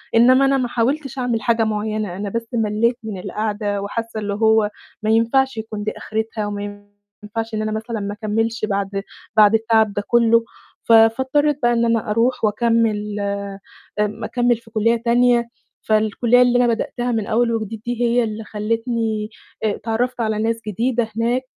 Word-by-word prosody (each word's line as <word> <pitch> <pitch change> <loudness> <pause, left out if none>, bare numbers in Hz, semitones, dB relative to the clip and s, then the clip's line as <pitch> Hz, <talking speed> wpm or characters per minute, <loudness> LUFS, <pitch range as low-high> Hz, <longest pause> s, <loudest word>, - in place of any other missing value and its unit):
إنّما 255 +4 +6
أنا 275 0 +3
ما 255 -2 0
حاولتش 270 +4 -1
أعمل 240 -3 -1
حاجة 230 0 +2
معيّنة، 215 -3 -2
أنا 200 +1 -3
بس 230 +2 -3
ملّيت 225 +1 +1
من 215 -4 -5
القعدة 205 0 -2
وحاسّة 225 +2 -4
اللي 205 -1 -2
هو 220 0 +3 0.3
ما 215 - 0
ينفعش 235 +3 +2
يكون 215 -1 -5
دي 215 - -1
آخرتها 220 0 -3
وما 205 0 -6 0.4
ينفعش 225 +2 -5
إن 215 - -1
أنا 215 0 -2
مثلًا 220 +1 -4
ما 200 0 -4
أكمّلش 220 +2 -1
بعد 200 -1 -2 0.3
بعد 210 0 +7
التعب 220 -1 +2
ده 205 - -2
كلّه، 230 -1 +4 0.4
ف - - -1
فاضطريت 265 +6 +4
بقى 240 0 +4
إن 235 0 +2
أنا 230 -2 0
أروح 230 +2 +1
وأكمّل 215 -1 +1 0.8
آمم 210 +1 -1
أكمّل 245 -1 +1
في 225 0 -19
كُلّية 225 +1 +2
تانية، 235 0 +2 0.3
فالكُلّية 220 +3 +2
اللي 245 0 +4
أنا - - +2
بدأتها 240 +1 -1
من 220 -3 -1
أول 230 +1 +2
وجديد 220 -1 -5
دي 240 0 -3
هي 240 +1 +3
اللي 220 0 -4
خلّتني 220 0 -2 0.3
آآ 215 -2 +1
اتعرّفت 240 +2 -2
على 220 -1 0
ناس 230 +1 -1
جديدة 235 +3 0
هناك 240 +3 +1
225 Hz, 170 wpm, -20 LUFS, 215-235 Hz, 0.8 s, بعد